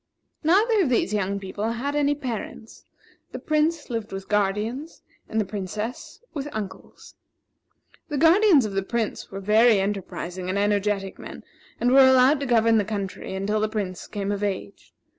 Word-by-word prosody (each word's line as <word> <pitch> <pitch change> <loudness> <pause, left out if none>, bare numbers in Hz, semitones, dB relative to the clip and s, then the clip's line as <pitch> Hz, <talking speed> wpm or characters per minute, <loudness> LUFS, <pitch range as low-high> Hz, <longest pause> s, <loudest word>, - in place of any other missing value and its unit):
Neither 415 +7 +4
of 320 - +1
these 235 -3 +1
young 200 -1 -1
people 205 +4 -3
had 280 +5 -3
any 290 0 +2
parents; 230 -4 -7 0.5
the - - -4
Prince 310 +1 0
lived 225 -2 -4
with 195 0 -6
guardians 210 +9 -1 0.3
and 220 - -1
the 215 - +1
Princess 210 +4 -5
with 285 -2 -4
uncles. 205 -3 -8 1.0
The 295 - -2
guardians 330 - +5
of 205 - -4
the 195 - 0
Prince 225 +3 -3
were 195 - -6
very 215 +2 +4
enterprising 185 -2 -4
and 190 - -1
energetic 205 -1 0
men, - - -9 0.4
and 245 - +2
were 270 - +7
allowed 260 +2 +6
to 280 - -3
govern 230 -2 +4
the - - +1
country 200 -2 -5
until 205 +3 -1
the 215 0 0
Prince 200 -4 -4
came 200 -1 -3
of 205 0 -3
age. 200 0 -4
215 Hz, 165 wpm, -24 LUFS, 200-265 Hz, 1.0 s, were